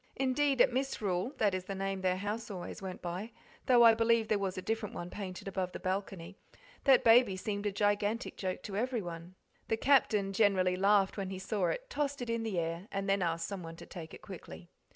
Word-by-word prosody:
Indeed 270 0 +2
at 250 - +5
Misrule 240 -4 -1
that 205 -4 +2
is 185 -1 -3
the 195 - -4
name 195 0 -2
their 185 -1 +1
house 210 +3 -4
always 185 -2 -6
went 190 -1 -7
by, 180 +6 -4 0.4
though 245 -2 +7
I 230 -1 +9
believe 230 0 +2
there 215 -2 +2
was 190 -2 -2
a - - -2
different 225 0 -2
one 175 +1 -6
painted 190 -2 -6
above 185 -2 -2
the - - -5
balcony 190 -1 -4 0.5
that 270 -2 +6
baby 225 -4 +6
seemed 205 +1 -3
a - - 0
gigantic 205 +3 0
joke 185 -1 -4
to 200 - -6
everyone. 185 -7 -3 0.3
The 225 - 0
Captain 215 -7 +3
generally 190 -3 +3
laughed 195 +1 +3
when 195 -2 -3
he 190 - -5
saw 190 -1 -1
it, - - -3
tossed 290 - -2
it 245 -2 -3
in 230 0 -1
the 220 -5 -3
air, 170 +3 -2
and 195 0 -2
then 195 0 +2
asked 165 -1 -1
someone 175 -5 -6
to - - -11
take 165 -4 -9
it - - -15
quickly. 85 - -10
200 Hz, 215 wpm, -32 LUFS, 185-225 Hz, 0.5 s, I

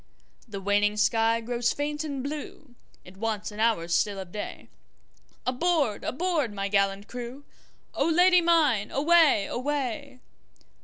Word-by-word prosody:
The 205 -3 -6
waning 205 +2 +1
sky 225 +2 +2
grows 240 +1 -1
faint 295 +1 -3
and 280 -4 -4
blue, 290 -2 -7 0.3
It 185 +1 -14
wants 220 0 -3
an 210 - -10
hour 220 -7 +1
still 200 +4 +1
of 190 -2 -8
day, 205 - -7 0.8
Aboard! 260 -3 0
aboard! 315 - -1
my 200 0 -2
gallant 200 0 +1
crew,O 250 +6 -6
Lady 360 +2 +5
mine 320 -11 +2
away! 305 -7 +4
away! 275 0 -3
240 Hz, 125 wpm, -27 LUFS, 205-295 Hz, 0.8 s, Lady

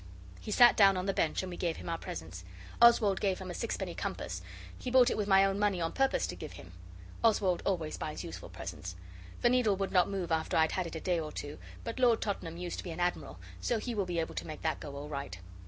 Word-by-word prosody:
He - - -9
sat 240 +3 +7
down 195 -2 +6
on 185 - -2
the 195 - 0
bench, 160 +1 0
and 185 - -5
we 175 - -6
gave 170 -2 -1
him - - -9
our 165 -1 -2
presents. 85 +2 -7 0.4
Oswald 225 -5 +6
gave 195 -3 +1
him 185 -1 -6
a - - -5
sixpenny - - -3
compass - - -4 0.4
he 255 - -4
bought 255 0 +6
it - - 0
with 210 -2 -1
my 195 -1 +6
own 195 0 0
money 205 -3 +2
on 165 -1 -1
purpose 270 0 +1
to - - -5
give - - -8
him. - - -11 0.5
Oswald 200 -5 +3
always 165 -5 -1
buys - - -4
useful - - -8
presents. 90 0 -7 0.5
The 240 - +5
needle 245 -5 +3
would 195 0 -2
not 180 -2 +4
move 190 -4 -3
after 160 0 +1
I'd 160 0 +4
had 185 -2 -1
it 170 - -8
a - - -3
day 175 +1 0
or 155 -1 -4
two, 145 0 -6 0.2
but 230 +2 -5
Lord 240 -3 +5
Tottenham 170 -5 -3
used 175 -1 -4
to - - -5
be 180 - -6
an 165 +1 -6
admiral, 175 0 -1 0.2
so 240 - 0
he 240 +2 -3
will 200 -4 -1
be 175 -1 -2
able 160 - -2
to - - -5
make 155 - -7
that 160 -1 0
go 145 -2 -7
all 145 +1 -6
right. 140 -11 -5
185 Hz, 255 wpm, -32 LUFS, 165-210 Hz, 0.5 s, sat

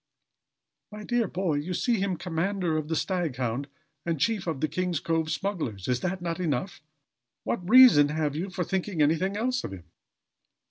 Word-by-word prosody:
"My 210 0 -8
dear 240 -1 0
boy, 180 -5 -1
you 170 +5 -3
see 235 +2 +1
him 190 -2 -1
commander 175 0 -1
of 155 -1 -2
the 160 - -1
Staghound 140 - -2 0.4
and 165 -3 -2
chief 210 +1 0
of 160 -5 -2
the 155 - +1
King's 175 +1 -1
Cove 165 -1 -1
smugglers. 155 - -3
Is 125 -1 0
not 185 0 -2
this 170 -1 -3
enough? 170 0 -2 0.6
What 180 -4 -3
reason 240 - +8
have 150 -1 -1
you 180 +5 -3
for 185 -1 -2
thinking 185 -2 -1
anything 165 +7 +1
else 255 +3 0
of - - -5
him?" 90 -3 -9
175 Hz, 175 wpm, -27 LUFS, 155-195 Hz, 0.6 s, reason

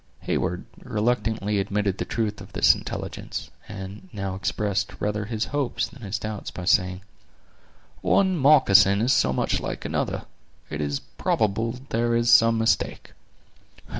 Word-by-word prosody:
Heyward 90 +1 -2
reluctantly 110 -3 0
admitted 100 0 -1
the - - -1
truth 110 -3 -2
of - - -12
this - - +6
intelligence, - - -6 0.2
and 100 - -8
now 100 -2 -4
expressed 95 +1 -2
rather 105 0 -1
his 110 0 -2
hopes 145 -4 -1
than 135 - -15
his 100 -2 -3
doubts 105 -1 -5
by 90 - -7
saying: 90 0 +2 1.0
"One 190 -1 +3
moccasin 105 - +6
is 120 +4 +3
so 125 - +3
much 65 - 0
like - - -5
another, - - -2 0.5
it 75 0 -3
is 70 -1 -2
probable 110 +2 -1
there 120 +1 +1
is 120 0 +3
some 115 0 +6
mistake." 115 +1 0
105 Hz, 140 wpm, -25 LUFS, 95-115 Hz, 1.0 s, this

